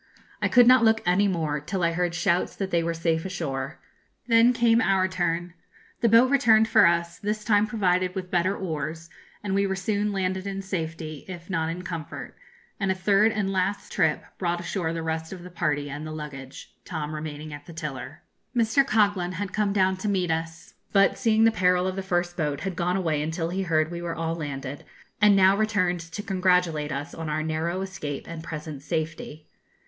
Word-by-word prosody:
I -, -, +3 dB
could 245 Hz, -1 st, +6 dB
not 255 Hz, -1 st, +7 dB
look 220 Hz, 0 st, +4 dB
any 185 Hz, +3 st, +3 dB
more, 160 Hz, -5 st, -1 dB
till 180 Hz, +5 st, -3 dB
I 170 Hz, -, +3 dB
heard 175 Hz, 0 st, -1 dB
shouts 175 Hz, +1 st, +1 dB
that 195 Hz, -1 st, -4 dB
they 170 Hz, -, +2 dB
were 165 Hz, 0 st, -2 dB
safe 165 Hz, -1 st, 0 dB
ashore. 155 Hz, -6 st, -4 dB, 0.5 s
Then 230 Hz, 0 st, +5 dB
came 230 Hz, -1 st, +3 dB
our 190 Hz, -2 st, +3 dB
turn. 175 Hz, -2 st, -2 dB, 0.5 s
The 230 Hz, -, +3 dB
boat 235 Hz, +4 st, +6 dB
returned 225 Hz, -6 st, +5 dB
for 220 Hz, -4 st, +6 dB
us, 170 Hz, 0 st, 0 dB
this 210 Hz, 0 st, -2 dB
time 210 Hz, -1 st, +3 dB
provided 185 Hz, -4 st, +1 dB
with 185 Hz, -1 st, -5 dB
better 185 Hz, +3 st, +1 dB
oars, 160 Hz, -1 st, -4 dB, 0.3 s
and 200 Hz, -2 st, -2 dB
we 200 Hz, 0 st, +2 dB
were 190 Hz, -, -1 dB
soon 205 Hz, +2 st, -1 dB
landed 190 Hz, 0 st, -2 dB
in 195 Hz, 0 st, -4 dB
safety, 165 Hz, -5 st, -5 dB
if 175 Hz, -1 st, -8 dB
not 165 Hz, -3 st, 0 dB
in 175 Hz, +2 st, -5 dB
comfort; 165 Hz, -5 st, -6 dB, 0.4 s
and 195 Hz, -2 st, +1 dB
a -, -, 0 dB
third 200 Hz, +4 st, +3 dB
and 210 Hz, -3 st, -1 dB
last 195 Hz, +1 st, -1 dB
trip 160 Hz, -5 st, +1 dB, 0.2 s
brought 175 Hz, -2 st, 0 dB
ashore 175 Hz, -1 st, -2 dB
the 165 Hz, -1 st, -4 dB
rest 160 Hz, 0 st, -3 dB
of 185 Hz, -2 st, -8 dB
the 180 Hz, -, -10 dB
party 150 Hz, -4 st, -1 dB
and 145 Hz, +2 st, -6 dB
the -, -, -6 dB
luggage, 145 Hz, -3 st, -8 dB
Tom 155 Hz, -3 st, -4 dB
remaining 155 Hz, 0 st, -6 dB
at 145 Hz, 0 st, -10 dB
the 170 Hz, -, -9 dB
tiller. 150 Hz, -2 st, -6 dB, 0.3 s
Mr. 230 Hz, +4 st, +4 dB
Coghlan 205 Hz, -7 st, +1 dB
had 190 Hz, +2 st, -4 dB
come 210 Hz, -2 st, +1 dB
down 190 Hz, -1 st, +2 dB
to 190 Hz, -, -4 dB
meet 185 Hz, -4 st, 0 dB
us, 165 Hz, +1 st, -4 dB, 0.2 s
but, 195 Hz, -1 st, +4 dB
seeing 225 Hz, -2 st, +2 dB
the 225 Hz, -, +6 dB
peril 180 Hz, -3 st, +2 dB
of 185 Hz, 0 st, -2 dB
the 195 Hz, -, -2 dB
first 175 Hz, -2 st, -1 dB
boat, 150 Hz, -4 st, -2 dB
had 190 Hz, -2 st, -3 dB
gone 180 Hz, +2 st, 0 dB
away 160 Hz, -5 st, 0 dB
until 160 Hz, +2 st, -2 dB
he 190 Hz, +2 st, -2 dB
heard 160 Hz, -3 st, +1 dB
we 170 Hz, 0 st, -5 dB
were 170 Hz, -1 st, -3 dB
all 165 Hz, 0 st, -2 dB
landed, 145 Hz, -3 st, -5 dB, 0.4 s
and 210 Hz, -1 st, +6 dB
now 190 Hz, 0 st, +6 dB
returned 200 Hz, -5 st, +1 dB
to 165 Hz, +5 st, -7 dB
congratulate 180 Hz, -6 st, +1 dB
us 145 Hz, +3 st, -4 dB
on 160 Hz, -1 st, -5 dB
our 155 Hz, +1 st, -1 dB
narrow 160 Hz, +3 st, -2 dB
escape 170 Hz, -7 st, -5 dB
and 165 Hz, -1 st, -7 dB
present 155 Hz, -3 st, -6 dB
safety. 155 Hz, -1 st, -4 dB
175 Hz, 205 wpm, -26 LUFS, 160-195 Hz, 0.5 s, not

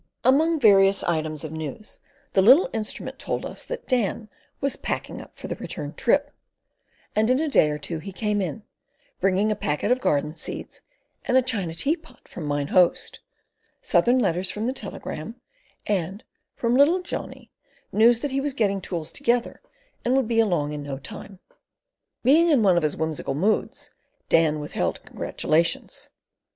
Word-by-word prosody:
Among 315 Hz, +5 st, +4 dB
various 195 Hz, -4 st, +5 dB
items 155 Hz, -3 st, -1 dB
of 155 Hz, -, -5 dB
news 160 Hz, +7 st, -7 dB, 0.3 s
the 190 Hz, -, +5 dB
little 260 Hz, -, +6 dB
instrument 220 Hz, -2 st, -4 dB
told -, -, -3 dB
us -, -, -7 dB
that -, -, -6 dB
Dan 230 Hz, -3 st, 0 dB, 0.3 s
was 275 Hz, -1 st, -1 dB
"packing -, -, -4 dB
up -, -, -16 dB
for -, -, -7 dB
the -, -, -2 dB
return -, -, -6 dB
trip"; -, -, +1 dB, 0.8 s
and 215 Hz, +2 st, +3 dB
in 255 Hz, +1 st, +3 dB
a 315 Hz, -, 0 dB
day 215 Hz, -, +4 dB
or 150 Hz, -, -2 dB
two 160 Hz, +2 st, -5 dB
he 195 Hz, +5 st, -7 dB
came 210 Hz, +1 st, -1 dB
in, 190 Hz, +4 st, -4 dB, 0.6 s
bringing 195 Hz, +3 st, +2 dB
a -, -, +1 dB
packet 150 Hz, +6 st, -1 dB
of 255 Hz, +1 st, +2 dB
garden 150 Hz, -, 0 dB
seeds 160 Hz, -, -7 dB, 0.4 s
and 255 Hz, -, +3 dB
a 260 Hz, -, +4 dB
china 200 Hz, -10 st, -2 dB
teapot 315 Hz, -, -3 dB
from 160 Hz, -4 st, -7 dB
Mine 145 Hz, 0 st, -1 dB
Host, 180 Hz, -2 st, +2 dB, 0.6 s
Southern 245 Hz, +2 st, +3 dB
letters 185 Hz, -6 st, +1 dB
from 210 Hz, +2 st, -3 dB
the 255 Hz, -, 0 dB
telegraph, 200 Hz, -, -7 dB, 0.5 s
and, 195 Hz, 0 st, -2 dB, 0.3 s
from 235 Hz, 0 st, +1 dB
little 325 Hz, +7 st, +4 dB
Johnny, -, -, -7 dB, 0.4 s
news 230 Hz, +2 st, +4 dB
that 290 Hz, -, -2 dB
he 270 Hz, +1 st, 0 dB
was 280 Hz, -1 st, -2 dB
getting 200 Hz, -5 st, +1 dB
tools 170 Hz, -3 st, -5 dB
together 245 Hz, -3 st, 0 dB, 0.4 s
and 250 Hz, +2 st, +2 dB
would 265 Hz, -4 st, +1 dB
be 230 Hz, -1 st, +1 dB
along 175 Hz, -9 st, +2 dB
in 150 Hz, -1 st, -5 dB
no 140 Hz, -1 st, -5 dB
time. 185 Hz, +8 st, -9 dB, 0.9 s
Being 315 Hz, +7 st, +5 dB
in 275 Hz, -8 st, +4 dB
one 190 Hz, -3 st, +5 dB
of 175 Hz, -, +3 dB
his 155 Hz, -2 st, -1 dB
whimsical 160 Hz, -3 st, -2 dB
moods, 200 Hz, +9 st, -1 dB, 0.4 s
Dan 155 Hz, -2 st, +3 dB
withheld 90 Hz, -, -3 dB
congratulations. 165 Hz, +2 st, -1 dB
205 Hz, 165 wpm, -24 LUFS, 160-250 Hz, 0.9 s, little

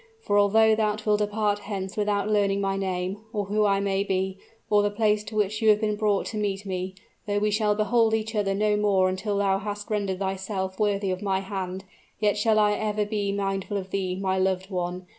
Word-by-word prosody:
For 205 Hz, -, -1 dB
although 220 Hz, +2 st, +5 dB
thou 215 Hz, -1 st, +1 dB
wilt 210 Hz, -1 st, +3 dB
depart 210 Hz, 0 st, 0 dB
hence 195 Hz, -1 st, -5 dB
without 205 Hz, -1 st, 0 dB
learning 200 Hz, -2 st, +2 dB
my 195 Hz, -1 st, 0 dB
name, 190 Hz, 0 st, -2 dB
or 205 Hz, -3 st, -2 dB
who 210 Hz, +2 st, +2 dB
I 195 Hz, -1 st, +2 dB
may 195 Hz, 0 st, 0 dB
be, 190 Hz, -1 st, -2 dB, 0.3 s
or 210 Hz, -1 st, +4 dB
the 205 Hz, -, +1 dB
place 210 Hz, 0 st, +1 dB
to 220 Hz, -, -8 dB
which 215 Hz, +1 st, 0 dB
you 220 Hz, -, +4 dB
have 210 Hz, -1 st, +5 dB
been 210 Hz, -1 st, 0 dB
brought 210 Hz, -2 st, +1 dB
to 215 Hz, -, -5 dB
meet 205 Hz, -1 st, -2 dB
me, 185 Hz, 0 st, -4 dB, 0.3 s
though 205 Hz, 0 st, 0 dB
we 210 Hz, +1 st, +1 dB
shall 210 Hz, 0 st, +2 dB
behold 220 Hz, +1 st, +3 dB
each 220 Hz, 0 st, -3 dB
other 200 Hz, -2 st, 0 dB
no 210 Hz, +1 st, +2 dB
more 200 Hz, -3 st, +3 dB
until 200 Hz, +2 st, -2 dB
thou 195 Hz, -1 st, +2 dB
hast 205 Hz, +1 st, -6 dB
rendered 200 Hz, -3 st, -1 dB
thyself 190 Hz, 0 st, -3 dB
worthy 200 Hz, -2 st, +1 dB
of 185 Hz, -, -3 dB
my 195 Hz, -2 st, 0 dB
hand, 190 Hz, -1 st, -5 dB, 0.4 s
yet 210 Hz, -1 st, +2 dB
shall 215 Hz, +1 st, +2 dB
I 210 Hz, -1 st, +4 dB
ever 210 Hz, 0 st, -1 dB
be 205 Hz, -1 st, -1 dB
mindful 195 Hz, 0 st, -2 dB
of 190 Hz, -1 st, -6 dB
thee, 185 Hz, -2 st, -1 dB
my 190 Hz, 0 st, -1 dB
loved 190 Hz, +1 st, 0 dB
one! 180 Hz, 0 st, -3 dB
205 Hz, 215 wpm, -26 LUFS, 190-210 Hz, 0.4 s, although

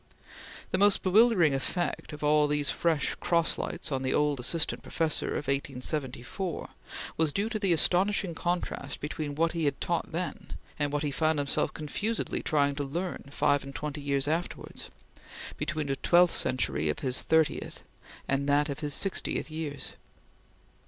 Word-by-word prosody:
The 185 Hz, -, +1 dB
most 205 Hz, 0 st, +4 dB
bewildering 190 Hz, -, +5 dB
effect 175 Hz, +8 st, -2 dB
of 150 Hz, 0 st, -8 dB
all 150 Hz, 0 st, +4 dB
these 145 Hz, -1 st, +1 dB
fresh 160 Hz, -4 st, +1 dB
cross 170 Hz, -2 st, +1 dB
lights 170 Hz, -2 st, -3 dB
on 135 Hz, -1 st, 0 dB
the 130 Hz, -, 0 dB
old 150 Hz, -2 st, +2 dB
Assistant 155 Hz, +6 st, 0 dB
Professor 160 Hz, -2 st, 0 dB
of -, -, -2 dB
1874 140 Hz, +4 st, -3 dB, 0.5 s
was 160 Hz, -2 st, +3 dB
due 200 Hz, +7 st, -1 dB
to 220 Hz, -1 st, -2 dB
the 195 Hz, -3 st, +1 dB
astonishing 180 Hz, +3 st, +2 dB
contrast 170 Hz, -4 st, -3 dB
between 145 Hz, -1 st, -4 dB
what 165 Hz, +2 st, +2 dB
he 165 Hz, -2 st, -1 dB
had 140 Hz, -1 st, 0 dB
taught 170 Hz, -1 st, -1 dB
then 175 Hz, +2 st, -4 dB, 0.3 s
and 145 Hz, -1 st, 0 dB
what 145 Hz, +1 st, -1 dB
he 145 Hz, -, -1 dB
found 155 Hz, +2 st, +1 dB
himself 140 Hz, -1 st, +1 dB
confusedly 205 Hz, +9 st, -2 dB
trying 145 Hz, -2 st, +2 dB
to 145 Hz, -, -1 dB
learn 170 Hz, +5 st, -4 dB
five 145 Hz, 0 st, +2 dB
and 140 Hz, 0 st, -9 dB
twenty 150 Hz, 0 st, -4 dB
years 140 Hz, -1 st, 0 dB
afterwards 165 Hz, +3 st, -3 dB, 0.7 s
between 155 Hz, 0 st, -2 dB
the 135 Hz, -1 st, -1 dB
twelfth 175 Hz, +3 st, +4 dB
century 130 Hz, -, +2 dB
of -, -, -1 dB
his 130 Hz, -2 st, +1 dB
thirtieth 160 Hz, -1 st, +1 dB, 0.4 s
and 140 Hz, +1 st, 0 dB
that 145 Hz, +1 st, +3 dB
of 140 Hz, -, -4 dB
his 145 Hz, -2 st, +1 dB
sixtieth 195 Hz, -4 st, 0 dB
years. 150 Hz, -3 st, -5 dB
150 Hz, 160 wpm, -29 LUFS, 140-170 Hz, 0.7 s, bewildering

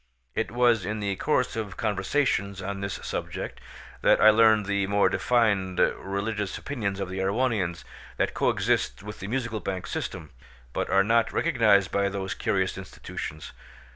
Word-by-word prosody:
It 110 Hz, -, -1 dB
was 120 Hz, -3 st, +3 dB
in 105 Hz, +4 st, -3 dB
the 100 Hz, -1 st, -1 dB
course 125 Hz, -1 st, +1 dB
of 105 Hz, -4 st, -4 dB
conversations 100 Hz, -1 st, 0 dB
on 100 Hz, +1 st, -4 dB
this 100 Hz, 0 st, -3 dB
subject -, -, -5 dB, 0.4 s
that -, -, +5 dB
I 110 Hz, -, +8 dB
learned 110 Hz, -1 st, +5 dB
the 100 Hz, 0 st, 0 dB
more 100 Hz, 0 st, +3 dB
defined 100 Hz, -7 st, +1 dB
religious 100 Hz, +3 st, -1 dB
opinions 105 Hz, -9 st, -3 dB
of 95 Hz, -, -2 dB
the 95 Hz, +1 st, -5 dB
Erewhonians, 95 Hz, -4 st, 0 dB, 0.3 s
that -, -, 0 dB
coexist -, -, 0 dB
with 105 Hz, +1 st, -8 dB
the 100 Hz, -, -6 dB
Musical 115 Hz, -2 st, -2 dB
Bank 95 Hz, -3 st, -4 dB
system, 75 Hz, -3 st, -5 dB, 0.4 s
but -, -, -2 dB
are 95 Hz, +1 st, +4 dB
not 115 Hz, +2 st, +2 dB
recognised 110 Hz, -, +3 dB
by 100 Hz, 0 st, +1 dB
those 95 Hz, -1 st, -3 dB
curious 95 Hz, 0 st, -1 dB
institutions. 75 Hz, -5 st, -7 dB
100 Hz, 155 wpm, -26 LUFS, 95-110 Hz, 0.4 s, I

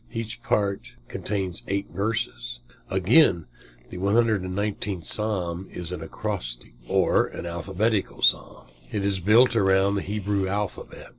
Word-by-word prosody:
Each 115 Hz, -1 st, -5 dB
part 100 Hz, -2 st, -1 dB
contains 95 Hz, -3 st, -3 dB
eight 100 Hz, +1 st, -2 dB
verses. 115 Hz, +4 st, -2 dB, 0.3 s
Again, 95 Hz, -, +4 dB, 0.4 s
the 90 Hz, -, -7 dB
119th 100 Hz, -3 st, 0 dB
Psalm 95 Hz, -4 st, -2 dB
is 90 Hz, -1 st, -6 dB
an 90 Hz, -, -5 dB
acrostic, -, -, -5 dB
or -, -, +3 dB
an -, -, -7 dB
alphabetical 95 Hz, +5 st, -1 dB
Psalm. -, -, +2 dB, 0.3 s
It 100 Hz, -1 st, -1 dB
is 100 Hz, -1 st, +1 dB
built 115 Hz, +7 st, +5 dB
around 95 Hz, -1 st, +3 dB
the 100 Hz, -, 0 dB
Hebrew 100 Hz, -1 st, -1 dB
alphabet. 100 Hz, +1 st, -4 dB
100 Hz, 125 wpm, -25 LUFS, 95-105 Hz, 0.4 s, built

